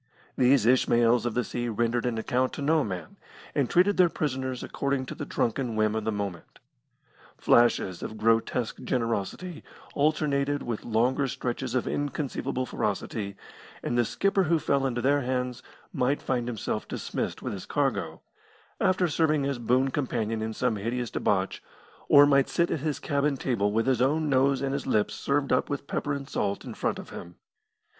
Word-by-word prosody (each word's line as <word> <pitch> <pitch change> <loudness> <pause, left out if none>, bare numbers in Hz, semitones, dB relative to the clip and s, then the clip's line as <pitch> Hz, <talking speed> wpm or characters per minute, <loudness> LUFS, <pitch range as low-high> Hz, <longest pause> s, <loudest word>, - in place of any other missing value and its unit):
These 130 -2 +4
Ishmaels 120 -1 +4
of 120 - -3
the 125 - +2
sea 120 +1 -3
rendered 120 +2 0
an 115 -2 -1
account 125 +3 0
to 145 - -5
no 155 +1 +3
man, 90 -7 -6 0.4
and 140 -4 +1
treated 190 +3 +3
their 180 -2 +6
prisoners 130 -5 -3
according 140 -1 -2
to - - -6
the - - -6
drunken 120 0 -1
whim 110 -1 +2
of 110 -1 -2
the 110 - +1
moment. 100 -4 -5 0.8
Flashes 115 -6 +3
of 110 - -6
grotesque 115 +1 +1
generosity 120 - -2 0.3
alternated 145 -1 +1
with 115 -3 -4
longer 125 +5 +1
stretches 125 0 -3
of 125 - 0
inconceivable 135 -2 -2
ferocity, 100 -2 -3 0.5
and 120 - -1
the 120 - +4
skipper 195 - +1
who 165 0 +3
fell 140 -2 +1
into 120 -2 -2
their 140 +3 +3
hands 125 -1 -2 0.3
might 130 +3 +1
find 125 -2 -1
himself 110 -2 -3
dismissed - - -4
with - - -3
his - - -7
cargo, - - -1 0.6
after 185 -2 +2
serving 155 -2 +1
as 140 -3 -2
boon 130 +3 +2
companion 115 -6 -1
in 110 0 -2
some 115 0 0
hideous 120 +3 -3
debauch, 95 -1 0 0.5
or 145 0 +9
might 140 -2 +3
sit 170 0 +1
at - - 0
his 150 0 -2
cabin 140 0 0
table 110 -6 0
with 115 +2 +1
his 130 -2 +2
own 150 +4 +2
nose 135 0 +3
and 135 0 -1
his 140 - -3
lips 105 -1 +1
served 140 -1 0
up 130 - +1
with 145 -1 -3
pepper 145 +1 -2
and 140 -1 -5
salt 100 -5 -2
in - - -6
front - - -1
of - - -9
him. 85 0 -9
130 Hz, 175 wpm, -27 LUFS, 115-140 Hz, 0.8 s, or